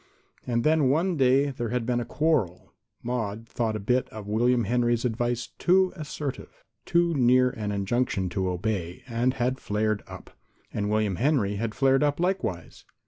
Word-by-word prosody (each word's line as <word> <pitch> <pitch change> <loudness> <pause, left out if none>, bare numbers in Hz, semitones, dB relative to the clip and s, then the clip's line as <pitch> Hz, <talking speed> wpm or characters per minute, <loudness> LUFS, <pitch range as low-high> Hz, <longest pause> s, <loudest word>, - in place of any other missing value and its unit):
And 120 -1 0
then 155 -3 +3
one 170 +6 +1
day 135 0 +3
there 120 -3 -4
had 120 0 -1
been 120 0 0
a 120 - -3
quarrel. 125 - -1 0.3
Maude 115 -2 -3
thought 115 -2 -2
a - - -2
bit 125 +6 0
of 110 -2 -9
William 120 +3 +2
Henry's 120 +2 +1
advice 120 0 -1
too 185 +1 +3
assertive, 150 -4 -6 0.2
too 170 0 +2
near 125 -2 +4
to - - -12
an 105 -1 -2
injunction 100 -1 0
to 95 +1 -1
obey, 90 -2 -3
and 120 +2 0
had 125 +2 -1
flared 105 0 -1
up. - - -11 0.4
And 105 -1 -1
William 105 -3 0
Henry 115 - +1
had 115 +1 -3
flared 135 -1 +3
up 145 0 +1
likewise. 175 - -2
120 Hz, 170 wpm, -26 LUFS, 110-135 Hz, 0.4 s, near